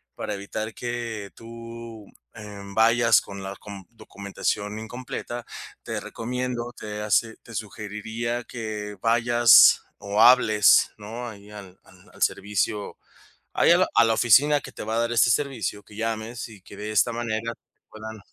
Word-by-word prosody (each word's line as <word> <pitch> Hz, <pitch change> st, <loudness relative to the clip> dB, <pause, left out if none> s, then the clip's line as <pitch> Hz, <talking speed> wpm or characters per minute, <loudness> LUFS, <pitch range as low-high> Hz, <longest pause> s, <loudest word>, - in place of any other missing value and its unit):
para 105 Hz, -, -4 dB
evitar 110 Hz, +2 st, -5 dB
que 115 Hz, -4 st, -5 dB
tú, 115 Hz, -1 st, -10 dB, 0.3 s
eh, 105 Hz, -2 st, -9 dB
vayas 115 Hz, +1 st, +5 dB
con 100 Hz, -1 st, -9 dB
la 95 Hz, +1 st, -6 dB
com 100 Hz, -3 st, -10 dB
documentación 105 Hz, -1 st, -4 dB
incompleta, 120 Hz, +1 st, -6 dB, 0.4 s
te -, -, -4 dB
recomiendo, 120 Hz, 0 st, -4 dB
te 105 Hz, 0 st, -6 dB
hace 110 Hz, +1 st, +1 dB
te 115 Hz, -, -13 dB
sugeriría 110 Hz, +3 st, -4 dB
que 105 Hz, -4 st, -6 dB
vayas 120 Hz, 0 st, +6 dB, 0.2 s
o 100 Hz, +1 st, -2 dB
hables, 110 Hz, -5 st, +6 dB
¿no? 115 Hz, +3 st, -7 dB
Ahí 105 Hz, -1 st, -13 dB
al 95 Hz, -3 st, -12 dB
al -, -, -20 dB
al -, -, -17 dB
servicio 105 Hz, +1 st, -1 dB, 0.6 s
ahí -, -, +4 dB
a -, -, +6 dB
la -, -, +3 dB
a 115 Hz, -, +6 dB
la 115 Hz, 0 st, +2 dB
oficina 145 Hz, +7 st, +5 dB
que -, -, -10 dB
te -, -, -7 dB
va 110 Hz, +1 st, -2 dB
a -, -, +2 dB
dar 115 Hz, 0 st, -1 dB
este 120 Hz, -, +4 dB
servicio, 115 Hz, -6 st, -1 dB
que 105 Hz, -, -16 dB
llames 115 Hz, +1 st, -4 dB
y 105 Hz, -4 st, -15 dB
que 100 Hz, -, -13 dB
de 105 Hz, +1 st, -5 dB
esta 115 Hz, +3 st, +3 dB
manera 115 Hz, 0 st, -3 dB, 0.4 s
puedan 110 Hz, 0 st, -9 dB
110 Hz, 155 wpm, -25 LUFS, 105-115 Hz, 0.6 s, vayas